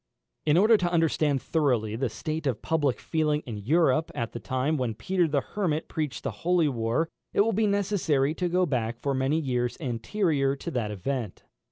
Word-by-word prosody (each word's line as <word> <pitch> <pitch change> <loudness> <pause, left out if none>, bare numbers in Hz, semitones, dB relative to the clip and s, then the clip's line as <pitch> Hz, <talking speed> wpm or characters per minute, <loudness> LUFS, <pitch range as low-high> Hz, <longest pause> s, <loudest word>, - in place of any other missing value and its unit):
In 150 +2 +5
order 215 +4 +6
to 175 -3 -1
understand 155 -4 +1
thoroughly 125 -9 +1
the 125 +1 -1
state 155 +5 -4
of 120 -5 -2
public 145 -5 +1
feeling 150 -2 0
in 115 -4 -5
Europe 155 - +2
at 115 -1 -3
the 120 - -6
time 130 +8 -1
when 125 -6 -1
Peter 175 - +1
the 145 -2 +1
Hermit 165 -5 -2
preached 155 -4 -3
the - - -2
holy 175 -2 +3
war, 120 +4 0 0.3
it - - +4
will 225 +2 +2
be 215 +2 +2
necessary 185 -8 +1
to 180 +1 -1
go 180 +1 +2
back 120 -6 -1
for 140 - -1
many 135 +4 +1
years 125 -5 -1
anterior 140 - 0
to 135 - -6
that 115 -4 -1
event. 105 +1 -4
145 Hz, 190 wpm, -27 LUFS, 125-165 Hz, 0.3 s, order